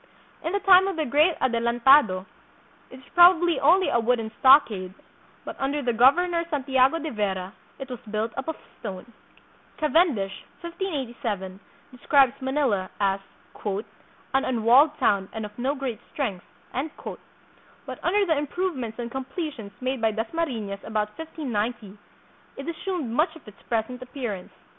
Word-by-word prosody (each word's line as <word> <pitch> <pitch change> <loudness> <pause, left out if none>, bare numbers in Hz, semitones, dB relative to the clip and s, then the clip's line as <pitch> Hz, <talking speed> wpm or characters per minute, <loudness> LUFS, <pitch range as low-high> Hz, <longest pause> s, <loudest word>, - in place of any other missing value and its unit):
In 330 - -2
the 405 - +1
time 380 0 +7
of 390 - -2
the 315 - 0
great 300 +6 +3
Adelantado 235 -4 +4 0.6
it - - -12
was 265 - -18
probably 350 -1 +6
only 355 +7 +4
a 235 - +2
wooden 230 -1 0
stockade, 220 -9 +5 0.5
but - - -6
under 280 +2 -1
the 240 -1 0
governor 335 +9 +4
Santiago 270 -1 +2
de 315 -2 -4
Vera 195 -3 -2 0.2
it 270 - -7
was 250 -3 -7
built 220 +1 -2
up 270 - -5
of 320 - -2 0.2
stone. 205 +2 -8 0.6
Cavendish 300 - +1 0.2
(1587) 255 - -4 0.3
describes 260 0 +3
Manila 260 -8 0
as 195 -1 +1 1.1
"an 270 - +3
unwalled 255 +6 +4
town 195 -2 +1
and 220 -1 -4
of 210 - -10
no 270 +4 0
great 260 -6 -4
strength," 205 -11 -3 0.3
but 285 +5 -9
under 400 +3 +2
the 325 -4 +2
improvements 290 -6 -3
and 235 -1 -5
completions 265 - -5
made 260 -1 -2
by 225 - +3
Das 220 +1 -4
mariiias 225 -12 -3
about 210 -1 -2
1590 240 -10 -4 0.6
it 275 - -7
assumed 335 - -3
much 310 +7 +1
of 320 - -16
its 210 - -14
present 235 +2 -2
ap 255 - -11
pearance. 215 -9 -4
260 Hz, 145 wpm, -25 LUFS, 220-310 Hz, 1.1 s, time